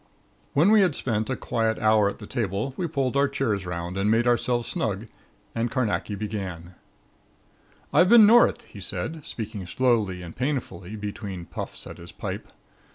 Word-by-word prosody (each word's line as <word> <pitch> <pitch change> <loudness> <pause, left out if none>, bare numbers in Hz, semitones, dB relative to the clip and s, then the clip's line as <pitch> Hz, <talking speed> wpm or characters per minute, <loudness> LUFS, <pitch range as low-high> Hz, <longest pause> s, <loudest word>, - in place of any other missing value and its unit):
When 165 +9 +5
we 215 -1 +7
had 180 -7 +3
spent 110 -2 -1
a 130 - 0
quiet 115 -3 -1
hour 110 -2 +4
at - - -7
the 105 - -9
table 110 +3 -2
we 175 - -2
pulled 135 -5 -1
our 140 +1 +4
chairs 115 -9 -1
'round 90 +1 -4
and 100 +2 +2
made 115 +2 +3
ourselves 120 0 +1
snug 105 0 -2 0.5
and 115 +1 -1
Carnacki 110 -3 -1
began: 95 -4 -5 1.2
"I've 180 +1 +5
been 230 -2 +9
North," 235 +3 +5
he - - -12
said, 160 -2 -4
speaking 110 -7 -6
slowly 105 -6 +1
and 85 - -9
painfully 115 -8 -3
between 100 -3 -6
puffs - - -6
at - - -9
his 85 0 -10
pipe. - - -5
110 Hz, 165 wpm, -25 LUFS, 100-130 Hz, 1.2 s, been